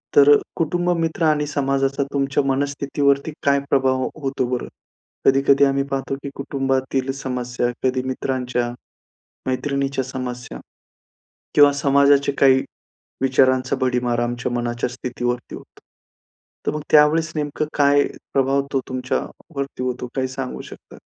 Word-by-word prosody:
तर 145 0 +8 0.2
कुटुंब 175 +2 0
मित्र 165 0 -1
आणि 150 -1 +2
समाजाचा 135 -1 0
तुमच्या 140 0 +1
मनस्थितीवरती 140 +1 0
काय 140 0 +3
प्रभाव 130 -1 +3
हो - - -1
होतो 135 -1 -1
बरं? 125 -1 -2 0.6
कधी-कधी 135 +1 +4
आम्ही 135 0 +1
पाहतो, 135 0 -2
की 140 0 -7
कुटुंबातील 135 -1 -1
समस्या 125 -3 -3 0.2
कधी 130 0 +1
मित्रांच्या, 125 -2 -2 0.8
मैत्रिणीच्या 135 +1 -1
समस्या 125 -1 -6 1.0
किंवा 145 -1 +7
समाजाचे 140 0 +3
काही 130 -1 +5 0.6
विचारांचा 130 0 +3
भडिमार 125 -2 0
आमच्या 120 +1 -2
मनाच्या 120 0 -1
स्थितीवरती 125 0 -4
होतो. - - -12 0.9
तर - - +1
मग 150 - -4
त्यावेळेस 155 +2 +5
नेमकं 150 0 -2
काय 145 0 +5 0.3
प्रभाव 135 +1 +2
तो 135 - +2
तुमच्या 130 0 -1 0.4
वरती 140 -2 -4
होतो 125 0 -3
काय 130 -1 0
सांगू 130 0 -5
शकता? - - -12
135 Hz, 125 wpm, -21 LUFS, 130-140 Hz, 1.0 s, तर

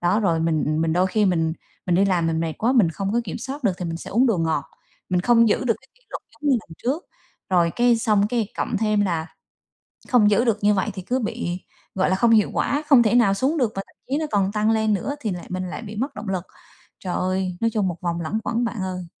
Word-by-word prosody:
Đó, 180 +5 +2
rồi 170 -6 +1
mình 155 -1 0
mình 165 0 +1
đôi 180 +3 +3
khi 210 +3 +1
mình 165 -3 +1 0.3
mình 180 - +2
đi 190 +3 +4
làm 180 -4 +1
mình 160 0 0
mệt 165 -1 -1
quá, 235 +4 +2
mình 220 -11 +4
không 195 +4 -3
có 235 - +2
kiểm - - -5
soát 275 +1 -6
được 205 - +3
thì 180 - -4
mình 165 -1 -3
sẽ - - -9
uống 245 +6 +3
đồ 225 -7 +2
ngọt, 160 -3 0 0.4
mình 180 -1 +1
không 230 +3 +4
giữ 215 - +1
được 230 -2 +2
cái 265 - -24
kỷ - - -30
luật - - -5
giống 300 -1 -2
như 260 - +5
lần 210 - -23
trước. 285 +9 -2 0.4
Rồi 175 -2 +3
cái 240 -1 +4
xong 210 -2 +2
cái 230 -4 -1
cộng 230 - -1
thêm 215 -1 +1
là 170 -5 0 0.8
không 225 -5 +5
giữ 235 +5 +3
được 225 -3 +2
như 210 0 +5
vậy 190 - 0
thì 190 - -6
cứ 245 +8 -1
bị, 180 -6 -4 0.3
gọi 190 -1 +2
là, 185 - +2
không 230 +4 +3
hiệu 215 -2 +4
quả, 290 +2 0
không 255 -4 +7
thể 215 - +2
nào 230 -5 +5
xuống 265 +10 0
được 245 -7 +1
và 195 - -2
thậm - - -25
chí 280 - +1
nó 315 - -1
còn 195 -1 +1
tăng 215 +1 +1
lên 220 -1 +2
nữa 265 +8 -2
thì 220 -8 -2
lại 175 - -6
mình 185 0 -3
lại 180 - -6
bị 215 -1 -8
mất 265 +6 -3
động 210 - -6
lực. 185 -3 -2 0.6
Trời 180 -2 -4
ơi, 185 -1 -1
nói 230 - +3
chung 205 -4 +1
một 175 - -3
vòng 170 -1 -2
luẩn 190 +7 -2
quẩn 235 +1 0
bạn 230 -4 -3
ơi. 185 -1 -4
205 Hz, 270 wpm, -23 LUFS, 180-235 Hz, 0.8 s, không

